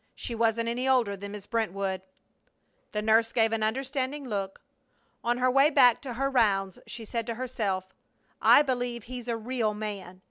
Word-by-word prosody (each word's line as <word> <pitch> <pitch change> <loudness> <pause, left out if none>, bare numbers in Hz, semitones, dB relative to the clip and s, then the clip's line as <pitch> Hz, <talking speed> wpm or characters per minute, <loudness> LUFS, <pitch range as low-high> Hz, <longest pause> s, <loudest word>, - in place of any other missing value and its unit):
"She 240 - -5
wasn't 230 0 +1
any 245 +3 -1
older 240 -6 +3
than 200 +1 -8
Miss 205 -1 -8
Brentwood." 195 -5 -2 0.9
The 210 0 -2
nurse 225 +1 +3
gave 225 -2 +2
an 225 -1 -1
understanding 265 +5 -2
look. 195 -4 -3 0.6
On 240 +1 +1
her 255 0 +2
way 275 +3 +5
back 250 -6 +5
to 255 -4 -6
her 275 +3 0
rounds 195 -7 +2
she 235 -2 -7
said 230 +1 -3
to 230 - -3
herself: 210 -7 -3 0.5
"I 290 - +7
believe 245 -4 -2
he's 245 0 -7
a 235 -1 -1
real 225 -2 -1
man! 200 -4 -6
230 Hz, 175 wpm, -28 LUFS, 210-250 Hz, 0.9 s, I